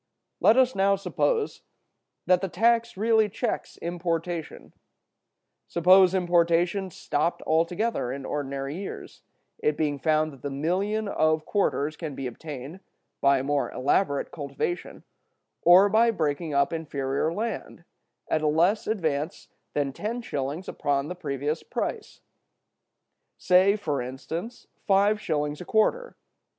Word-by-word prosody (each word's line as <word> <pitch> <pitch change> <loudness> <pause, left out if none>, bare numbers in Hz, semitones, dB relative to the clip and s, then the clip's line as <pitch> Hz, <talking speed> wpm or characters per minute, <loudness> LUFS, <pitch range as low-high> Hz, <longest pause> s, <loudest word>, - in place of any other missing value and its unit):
Let 225 - +5
us 260 -1 +4
now 195 +1 +3
suppose 440 - -1 0.6
that 180 -1 +4
the 195 - -1
tax 235 +2 +2
really 220 0 +3
checks 230 +4 -3
importation. 170 -1 -4 0.9
Suppose 185 +2 +5
importation 175 +1 +2
stopped 170 0 -2
altogether 170 - 0
in 135 0 -6
ordinary 140 0 -3
years; 195 0 -8 0.4
it 150 -1 0
being 145 -2 -1
found 155 +1 +1
that 135 - -15
the 140 - -3
million 190 +10 -1
of 155 -4 +1
quarters 155 -7 0
can 150 -3 -6
be 135 - -5
obtained, 140 +5 -7 0.4
by 140 0 +5
a 130 - -2
more 145 0 0
elaborate 140 +2 0
cultivation, 145 +4 -4 0.6
or 180 +4 +7
by 225 +3 +4
breaking 160 -5 -1
up 140 +2 +2
inferior 140 -2 -2
land, 225 +6 -4 0.4
at 155 - 0
a 155 - +1
less 170 +8 +2
advance 160 -7 -2 0.3
than 140 -2 0
ten 230 - -4
shillings 145 +1 -4
upon 140 +1 -1
the 180 - -4
previous 150 -1 -3
price—say, 185 +3 -2
for 150 -10 -2
instance, 160 - -6 0.2
five 205 +2 +3
shillings 150 -4 -2
a - - -7
quarter. 485 - +1
170 Hz, 125 wpm, -26 LUFS, 145-200 Hz, 0.9 s, or